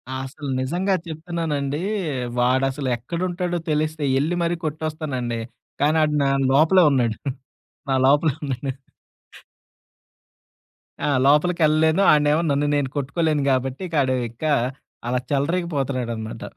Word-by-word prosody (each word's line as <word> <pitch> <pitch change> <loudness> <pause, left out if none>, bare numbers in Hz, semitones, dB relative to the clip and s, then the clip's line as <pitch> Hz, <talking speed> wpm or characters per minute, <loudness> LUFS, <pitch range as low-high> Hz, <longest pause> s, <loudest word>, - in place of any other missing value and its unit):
అసలు 135 +2 -6
నిజంగా 175 +9 0
చెప్తున్నానండి 155 -3 -3 0.6
వాాడసలెక్కడుంటాడో 135 +8 0
తెలిస్తే 155 0 -1 0.2
ఎళ్లి 160 +5 0
మరి 170 +1 0
కొట్టొస్తానండి. 150 -6 -3 0.4
కానీ 150 +2 +3
ఆడ్ 150 -1 +1
నా 135 - +2 0.2
లోపలే 160 +7 +5
ఉన్నాడు. 120 -5 +1 0.7
నా 135 - +2
లోపలే 145 +1 +3
ఉన్నాడు. 135 -1 -3 2.3
ఆ! - - 0 0.2
లోపలికెళ్ళలేను. 160 +2 +3
ఆడనేమో 150 +1 +3
నన్ను 145 +1 +1
నేను 140 -2 0
కొట్టుకోలేను 150 +1 0
గాబట్టి 130 +2 -1
ఇకాడు 140 -5 +1
ఇక 120 +6 -14 0.6
అలా 125 +1 +1
చెలరేగిపోతున్నాడనమాట. 135 -7 -2
145 Hz, 100 wpm, -22 LUFS, 130-160 Hz, 2.3 s, లోపలే